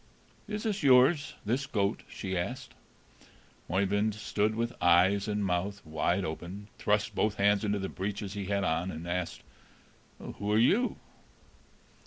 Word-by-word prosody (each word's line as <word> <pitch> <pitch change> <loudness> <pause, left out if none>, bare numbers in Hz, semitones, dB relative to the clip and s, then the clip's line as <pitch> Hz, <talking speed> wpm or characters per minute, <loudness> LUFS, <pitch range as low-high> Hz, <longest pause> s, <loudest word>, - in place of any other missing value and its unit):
"Is 210 +1 -4
it 210 -2 -1
yours 140 +2 +5
this 130 +6 0
goat?" 100 -5 0
she 95 -2 -4
asked. 120 +9 -4 1.0
Oeyvind 100 +4 +1
stood 110 0 0
with 115 +1 -1
eyes 95 +4 +4
and 105 -1 -1
mouth 95 +2 -2
wide 80 0 0
open, 90 +6 -6
thrust 105 0 +1
both 110 -1 +1
hands 100 +1 +3
into 105 -1 0
the 95 -1 -3
breeches 100 +1 -4
he 100 -1 -4
had 100 0 0
on, 90 0 0
and 85 -1 -6
asked, 90 0 -3 0.7
"Who 105 0 -5
are 105 - +4
you?" 205 - +3
100 Hz, 145 wpm, -30 LUFS, 95-110 Hz, 1.0 s, yours